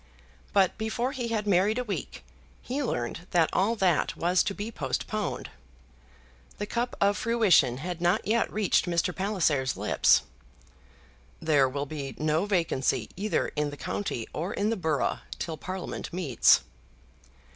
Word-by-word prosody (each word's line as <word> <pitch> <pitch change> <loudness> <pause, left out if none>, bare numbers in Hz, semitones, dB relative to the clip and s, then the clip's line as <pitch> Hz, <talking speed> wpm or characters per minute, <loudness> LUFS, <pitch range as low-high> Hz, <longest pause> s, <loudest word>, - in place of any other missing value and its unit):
But 195 +1 +2
before 235 +4 -1
he 255 -4 -3
had 220 -2 -1
married 200 +3 +3
a 250 - 0
week 210 -5 -5 0.4
he 270 +4 -2
learned 165 - -3
that 165 -2 +3
all 205 +5 +2
that 185 -7 +1
was 175 +2 +3
to 200 - -2
be 210 +2 -5
postponed. 215 -2 -3 1.1
The 205 - -3
cup 240 +3 -2
of 200 0 +3
fruition 200 - +3
had 175 +4 -5
not 175 +5 +2
yet 230 +2 +1
reached 210 -3 +2
Mr. 170 0 0
Palliser's 165 - 0
lips. - - +3 1.2
"There 145 -4 +3
will 140 +2 -3
be 140 -4 -6
no 155 +5 +1
vacancy 170 -9 0
either 205 +3 0
in 150 -1 -1
the 145 - -9
county 135 - -3
or 175 +6 -3
in 210 +2 0
the - - +1
borough 160 -7 0 0.2
till 165 - -4
Parliament 185 +4 -6
meets." 165 -9 +4
185 Hz, 145 wpm, -28 LUFS, 155-215 Hz, 1.2 s, meets